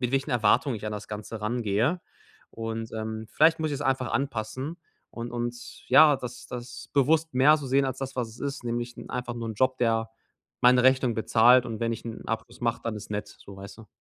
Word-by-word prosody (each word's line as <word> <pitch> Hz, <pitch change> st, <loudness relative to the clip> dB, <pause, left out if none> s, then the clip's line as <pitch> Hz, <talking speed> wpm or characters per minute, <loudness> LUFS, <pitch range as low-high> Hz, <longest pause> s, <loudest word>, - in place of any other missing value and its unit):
mit 125 Hz, -1 st, 0 dB
welchen 135 Hz, +2 st, 0 dB
Erwartungen 120 Hz, +3 st, +3 dB
ich 105 Hz, -, -7 dB
an -, -, -2 dB
das 105 Hz, -, -6 dB
Ganze 105 Hz, +1 st, -7 dB
rangehe. 120 Hz, -, 0 dB, 0.5 s
Und, 115 Hz, 0 st, -5 dB
ähm, 110 Hz, 0 st, -5 dB
vielleicht 160 Hz, +1 st, +4 dB
muss 155 Hz, -1 st, -1 dB
ich -, -, -1 dB
es 140 Hz, -, -5 dB
einfach 130 Hz, -3 st, 0 dB
anpassen 130 Hz, +3 st, -3 dB, 0.3 s
und 120 Hz, 0 st, -6 dB
uns 120 Hz, 0 st, -6 dB
ja, 150 Hz, -3 st, +7 dB
das 125 Hz, -1 st, -8 dB
das 125 Hz, 0 st, -8 dB
bewusst 155 Hz, +4 st, +2 dB
mehr 145 Hz, +4 st, +6 dB
so 140 Hz, -3 st, -6 dB
sehen 135 Hz, +1 st, +3 dB
als 130 Hz, 0 st, -3 dB
das, 135 Hz, -1 st, -5 dB
was 125 Hz, -, -1 dB
es 110 Hz, -, -14 dB
ist, 140 Hz, -3 st, -4 dB
nämlich 120 Hz, 0 st, -3 dB
'n -, -, -10 dB
einfach 125 Hz, -1 st, -4 dB
nur 115 Hz, -1 st, -5 dB
'n 110 Hz, -, -4 dB
Job, 130 Hz, +3 st, +1 dB
der 115 Hz, -1 st, +1 dB, 0.5 s
meine 125 Hz, 0 st, +6 dB
Rechnungen 130 Hz, -2 st, +3 dB
bezahlt 115 Hz, +3 st, +5 dB
und 110 Hz, -2 st, -5 dB
wenn 115 Hz, 0 st, 0 dB
ich 115 Hz, -, -6 dB
'n 115 Hz, -1 st, -7 dB
Abschluss 115 Hz, +2 st, -5 dB
mache, 115 Hz, -1 st, 0 dB
dann 110 Hz, -2 st, -3 dB
ist 105 Hz, -, -9 dB
nett, 105 Hz, 0 st, -3 dB
so, 100 Hz, -1 st, -12 dB
weißt 100 Hz, +3 st, -10 dB
du. 110 Hz, -, -13 dB
120 Hz, 225 wpm, -27 LUFS, 115-130 Hz, 0.5 s, ja